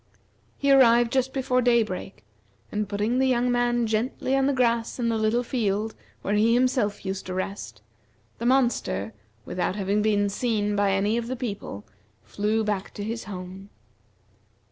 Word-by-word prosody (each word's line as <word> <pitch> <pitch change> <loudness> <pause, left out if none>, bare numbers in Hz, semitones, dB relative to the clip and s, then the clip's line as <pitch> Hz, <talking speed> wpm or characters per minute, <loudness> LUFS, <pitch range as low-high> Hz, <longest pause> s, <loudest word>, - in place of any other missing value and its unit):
He 280 -1 +2
arrived 240 -3 +6
just 265 0 +1
before 255 -2 +1
daybreak, 225 - 0 0.5
and 210 -1 -2
putting 210 +5 0
the 265 - +3
young 245 -1 +2
man 240 -1 +1
gently 230 +4 -1
on 270 0 +2
the - - +3
grass 235 -3 +1
in 235 -2 0
the 230 - 0
little 220 +3 +1
field 220 -3 -1 0.3
where 200 - -1
he 220 +3 +4
himself 245 -6 +1
used 190 0 -4
to 185 - -4
rest, 185 - -5 0.6
the 235 - -1
monster, 240 - +1 0.3
without 180 +4 -2
having 205 +1 0
been 205 -1 +2
seen 210 -1 -1
by 200 -1 +2
any 205 +3 +1
of 235 -1 -3
the 255 - -3
people, 205 - -6 0.4
flew 210 - -1
back 205 -2 -3
to 205 - -5
his 225 +2 -4
home. 190 0 -8
220 Hz, 165 wpm, -25 LUFS, 200-245 Hz, 0.6 s, arrived